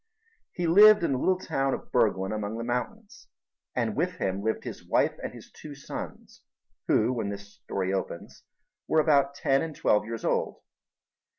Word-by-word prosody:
He 175 - -3
lived 210 +4 +7
in 165 - +1
the 130 - 0
little 185 +5 +2
town 135 -6 -1
of - - -12
Burglen 105 -5 +1
among 105 0 -3
the 115 - -4
mountains, 160 - -5 0.5
and - - -1
with - - 0
him 95 +1 -2
lived 110 +2 -1
his - - -7
wife - - +2
and - - -4
his - - -13
two 150 -2 -10
sons, 140 - -8 0.5
who, 115 +4 +3
when 115 -5 -2
this 100 0 -7
story 95 0 -3
opens, 95 -3 -5 0.5
were 160 - +3
about 140 -3 +3
ten 135 0 +2
and 160 -2 -5
twelve 105 0 +2
years 115 0 -5
old. - - -1
125 Hz, 175 wpm, -27 LUFS, 105-155 Hz, 0.5 s, lived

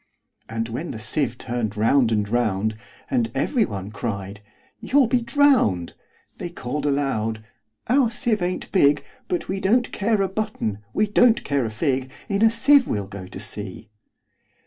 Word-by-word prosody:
And 115 0 -2
when 130 +9 -5
the - - -5
sieve 120 +2 -1
turn'd 120 -4 -3
round 115 +2 +3
and 105 -2 +1
round, 110 -2 0 0.4
And 240 -3 +1
every 245 -6 +2
one 100 -1 -6
cried, 100 -2 -5 0.4
"You 250 +6 +3
'll - - +5
be 245 +1 +2
drown'd!"They 235 - 0
call'd 145 -2 -4
aloud, 115 -6 -1 0.4
"Our 255 0 +4
sieve 230 -4 0
ain't 180 +1 -3
big:But 145 +1 +1
we 190 +1 -2
don't 230 +6 +2
care 210 0 +1
a - - +1
button; 190 - -3
we 210 - +2
don't 225 +3 +4
care 140 -3 0
a - - -2
fig:In 130 - -2
a 225 - +7
sieve 260 +4 +5
we 105 - -1
'll 100 - -5
go 95 -2 -9
to 95 - -9
sea!" 105 0 -6
140 Hz, 160 wpm, -23 LUFS, -, 0.4 s, a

